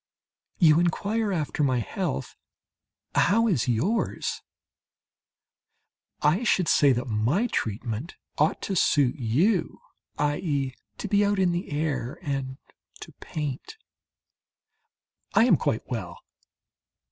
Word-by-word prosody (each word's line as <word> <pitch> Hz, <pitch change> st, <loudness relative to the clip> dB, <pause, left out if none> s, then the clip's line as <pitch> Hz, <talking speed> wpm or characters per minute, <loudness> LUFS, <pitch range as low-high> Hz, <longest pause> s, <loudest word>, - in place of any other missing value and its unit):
You 160 Hz, -2 st, +5 dB
inquire 205 Hz, +5 st, 0 dB
after 155 Hz, -4 st, -2 dB
my 130 Hz, -3 st, +2 dB
health. 70 Hz, -, -3 dB, 0.8 s
How 230 Hz, +5 st, +3 dB
is 160 Hz, -, +1 dB
yours? 150 Hz, -, -1 dB, 1.8 s
I 155 Hz, +8 st, +3 dB
should 185 Hz, -6 st, +2 dB
say 140 Hz, -2 st, +5 dB
that 120 Hz, +1 st, -2 dB
my 120 Hz, -, +1 dB
treatment 115 Hz, -, -3 dB, 0.2 s
ought 150 Hz, +2 st, +1 dB
to 195 Hz, -, -2 dB
suit 145 Hz, -7 st, +3 dB
you 160 Hz, -, +1 dB, 0.4 s
i.e., 145 Hz, -2 st, -1 dB, 0.2 s
to -, -, -4 dB
be 205 Hz, +1 st, +3 dB
out 205 Hz, 0 st, +1 dB
in 185 Hz, -2 st, +3 dB
the 175 Hz, +1 st, -3 dB
air 145 Hz, -5 st, -2 dB
and 135 Hz, -2 st, -3 dB, 0.4 s
to -, -, -9 dB
paint. 150 Hz, -, -5 dB, 1.6 s
I 225 Hz, -, +6 dB
am 250 Hz, -, +5 dB
quite -, -, -1 dB
well. -, -, -5 dB
150 Hz, 110 wpm, -26 LUFS, 130-190 Hz, 1.8 s, I